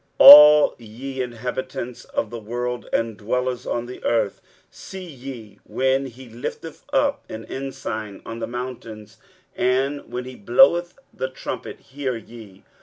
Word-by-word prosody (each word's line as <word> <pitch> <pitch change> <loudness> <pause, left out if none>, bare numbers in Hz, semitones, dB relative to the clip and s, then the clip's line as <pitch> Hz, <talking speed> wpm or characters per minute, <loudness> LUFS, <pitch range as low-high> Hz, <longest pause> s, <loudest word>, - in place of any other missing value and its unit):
23:018:003 - - +11
All 150 +1 +9
ye 130 +4 -7
inhabitants 125 0 -5
of 110 - -3
the 120 - -6
world, 120 +3 -4
and 115 -2 -1
dwellers 125 +4 -2
on 120 0 -2
the 125 +1 -10
earth, 115 -4 0 0.3
see 190 -1 -10
ye, 130 - -10
when 135 +1 0
he 130 +1 -13
lifteth 120 +7 -8
up 280 0 +1
an 110 0 -7
ensign 130 -6 -6
on 115 0 -7
the - - -4
mountains; 115 -3 -8 0.4
and 135 +2 -1
when 125 +1 -4
he 130 0 -9
bloweth 175 - +3 0.2
a 130 - -1
trumpet, 130 - -7
hear 135 -3 -4
ye. 110 -3 -13
125 Hz, 145 wpm, -22 LUFS, 115-135 Hz, 0.4 s, 23:018:003